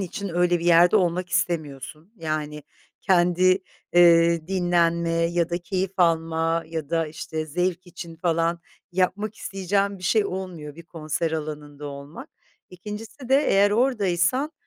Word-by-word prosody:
için 200 +2 -4
öyle 175 0 +1
bir 170 - -6
yerde 175 0 +6
olmak 180 0 0
istemiyorsun. 160 - -3
Yani, 155 -3 -4 0.4
kendi, 185 0 +3 0.3
eee, 170 -2 +5
dinlenme 170 -2 +1
ya 170 0 0
da 175 - -1
keyif 185 +2 -2
alma 165 -1 +1
ya 160 -3 -6
da, 165 -1 +1
işte, 155 +1 -5
zevk 180 +3 -2
için 170 -1 -9
falan 170 0 0 0.3
yapmak 195 +4 0
isteyeceğin 195 0 -1
bir - - -15
şey 210 +3 +2
olmuyor 180 -6 -6
bir 170 - -10
konser 165 0 -3
alanında 150 -2 -6
olmak. 140 +3 -9 0.4
2'ncisi 215 +7 -9
de 265 - +4
eğer 200 +1 +4
oradaysan 225 - +1
175 Hz, 135 wpm, -24 LUFS, 165-185 Hz, 0.4 s, yerde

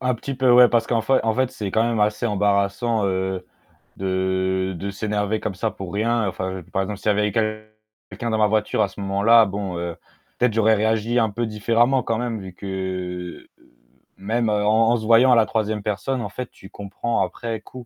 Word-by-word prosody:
Un 125 -1 0
petit 135 +4 -5
peu, 130 -1 +2
ouais. 125 0 +8
Parce 115 -1 +1
qu'en 115 -1 +1
fai 130 +3 +3
en 110 - +1
fait, 130 +1 +1
c'est 105 -7 -5
quand 110 - +2
même 115 -2 0
assez 105 +3 +1
embarrassant, 105 +2 +1
heu, 95 -1 -2 0.5
de 95 0 -1
de 100 +4 -4
s'énerver 105 +1 -2
comme 105 - -3
ça 90 - -1
pour 95 -2 -8
rien, 115 +1 +1
enfin 95 0 -4
par 95 - +1
exemple, 100 +1 -4
s'il - - -6
y - - +5
avait 105 0 +1
eu - - -3 0.8
quelqu'un 120 - -5
dans 110 - 0
ma 105 - +4
voiture 105 0 0
à - - +3
ce 95 - -13
moment-là, 100 +4 +4
bon, 95 -3 -4
heu, 85 -1 -4 0.4
peut-être 125 -3 +2
j'aurais 110 0 +4
réagi 110 +3 +1
un 110 - +2
peu 115 +3 -2
différemment 115 +4 +2
quand 115 0 -1
même, 120 -2 -3
vu 95 -1 -9
que 90 -2 -5 0.7
même 110 +4 -1
en 105 +2 +3
en 120 - +3
se 110 - -6
voyant 115 +3 +5
à 125 - +7
la 115 - +5
3e 110 -2 -2
personne, 120 +5 -2
en - - -4
fait, 125 -1 -6
tu 95 - -15
comprends 100 +4 -3
après 115 -2 -5
coup 125 +2 -11
105 Hz, 210 wpm, -22 LUFS, 95-115 Hz, 0.8 s, ouais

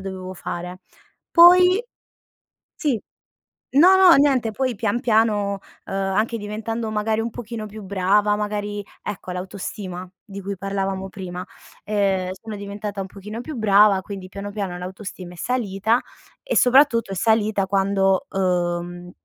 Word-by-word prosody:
dovevo 190 -1 -6
fare. 180 +2 -6 0.5
Poi 360 +4 +7 1.0
sì, 285 -7 +1 0.7
no 350 +7 +7
no 375 -2 +8
niente, 270 -5 +3
poi 255 +2 -1
pian 220 +3 -1
piano, 215 -4 +1 0.3
ehm, - - -7 0.2
anche 225 +3 0
diventando 220 +2 -4
magari 215 +1 0
un 230 0 -3
pochino 225 -2 -6
più 215 +1 -9
brava, 200 +2 +2
magari 205 -1 -3 0.2
ecco 195 -3 -6
l'autostima 185 0 -6 0.2
di 200 -1 -9
cui 200 +1 -4
parlavamo 195 0 -3
prima, 180 -2 -6 0.4
ehm, 195 -3 0
sono 220 -1 -7
diventata 205 0 -5
un 190 - -5
pochino 210 +4 -8
più 310 +4 -7
brava, 205 -3 +5
quindi 195 -2 -7
piano 200 +2 -7
piano 195 -4 -4
l'autostima 185 0 -8
è - - -12
salita. 225 -1 0 0.4
E - - -2
soprattutto 250 -4 +4
è - - -4
salita 215 -1 +2
quando, 195 0 +1
uhm, 175 -1 -2
205 Hz, 135 wpm, -22 LUFS, 190-225 Hz, 1.0 s, no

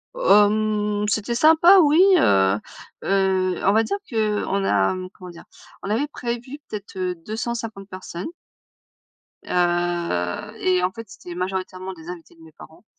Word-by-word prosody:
Hem, 210 - +2
c'était 220 +3 -1
sympa 325 +7 +6
oui. 305 +2 +4 0.2
Heu, 95 - +3 0.4
heu, 190 -1 +1
on 200 - +4
va 225 +1 +4
dire 400 - -2
qu'on 210 -3 -1
a, 100 - +2
mmh, 185 0 -6
comment 180 -1 -11
dire? 170 -1 -12 0.4
On - - -5
avait 235 +8 0
prévu 245 +2 -6
peut-être, 205 -2 -8
heu, 180 -1 -2
250 220 -2 -5
personnes. 185 -1 -7 1.2
Heu, 175 - -1
et 185 -1 +2
en 180 - +1
fait 230 +3 -9
c'était 180 -2 -10
majoritairement 185 0 -4
des 165 0 -12
invités 170 -2 -10
de 165 - -21
mes 160 - -15
parents. 160 +8 -16
195 Hz, 150 wpm, -22 LUFS, 180-220 Hz, 1.2 s, sympa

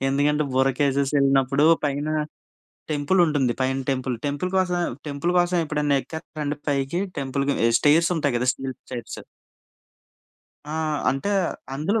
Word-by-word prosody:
ఎందుకంటే 145 +2 +2
బొర్రా 130 +1 +3
కేవ్స్ 140 0 +1
ఎళ్ళినప్పుడు, 135 +1 +3 0.2
పైన 145 +1 -1 0.8
టెంపులుంటుంది. 150 -3 +2
పైన 130 +1 +1
టెంపుల్, 130 -2 -1
టెంపుల్ 145 +6 -2
కోసమే 180 -2 +1 0.3
టెంపుల్ 145 +5 -1
కోసం, 175 0 +2
ఎప్పుడైనా 150 -2 0
ఎక్కేత్తారండి 150 -2 -5
పైకి? 140 +4 0 0.2
టెంపుల్‌కి 140 +1 -1
ఎహ్, 115 - +2
స్టేర్సుంటాయి 155 -2 +3
గదా! 125 +2 -1
Steel 135 -1 -6
stairs. 120 -2 -7 1.5
ఆ! - - -3 0.4
అంటే, 135 +10 -2 0.4
అందులో 170 +11 0
145 Hz, 120 wpm, -24 LUFS, 135-155 Hz, 1.5 s, బొర్రా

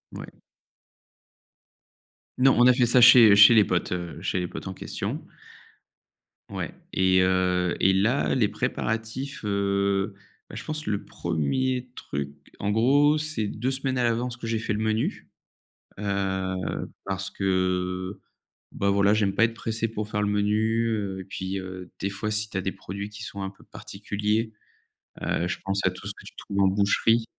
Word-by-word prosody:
Ouais. - - -9 2.0
Non 135 +1 +5
on 120 - +7
a 125 - +7
fait 125 0 +3
ça 120 +1 +5
chez 120 -3 +9
chez 105 +3 +9
les 110 - +7
potes, 90 -2 -1
heu, 85 -2 -5
chez 95 0 -1
les 90 - -2
potes - - -8
en 95 - -4
question. - - -5 1.3
Ouais - - -5 0.2
et 95 0 +3
heu 90 -1 +1
et 95 - +5
là 105 +8 +2
les 125 -5 +3
préparatifs, 115 +8 -3
heu, 100 0 0 0.4
bah - - -10
je - - -6
pense 155 0 -5
le 105 -1 -2
1er 125 - -2
truc 70 0 -4 0.3
en 100 - -1
gros, 140 +7 +4
c'est 150 -8 -2
2 125 +5 -2
semaines 130 0 -1
à 125 - +2
l'avance 120 +1 -1
que 115 - -7
j'ai 115 0 0
fait 110 - -3
le 105 - -1
menu. 110 0 -1 0.7
Heu, 95 -2 -2 0.2
parce 95 -1 -3
que 95 0 -1 0.5
bah, 100 - -1
voilà 100 +1 +3
j'aime 100 -3 +1
pas 115 - +4
être 115 - +1
pressé 115 0 -2
pour 105 -1 -5
faire 105 -1 -1
le 105 - +1
menu, 110 +3 +1
heu 100 -4 -2
et - - -7
puis, 95 +1 -4
heu, 95 -1 -8
des 100 - -1
fois 100 +2 -4
si 105 0 -1
tu 100 - -7
as 95 - -1
des 95 - -2
produits 100 +2 -7
qui 105 +2 -8
sont 100 -3 -6
un 95 - -3
peu 95 - -21
particuliers, 105 +2 -3 0.7
heu, 85 - -1
je 90 - -3
pense 95 0 0
à 90 - +3
tout 90 +2 -9
ce 100 - -4
que - - -14
tu - - -11
trouves 100 0 -2
en 95 - +5
boucherie 105 +4 +2
100 Hz, 180 wpm, -25 LUFS, 95-115 Hz, 2.0 s, chez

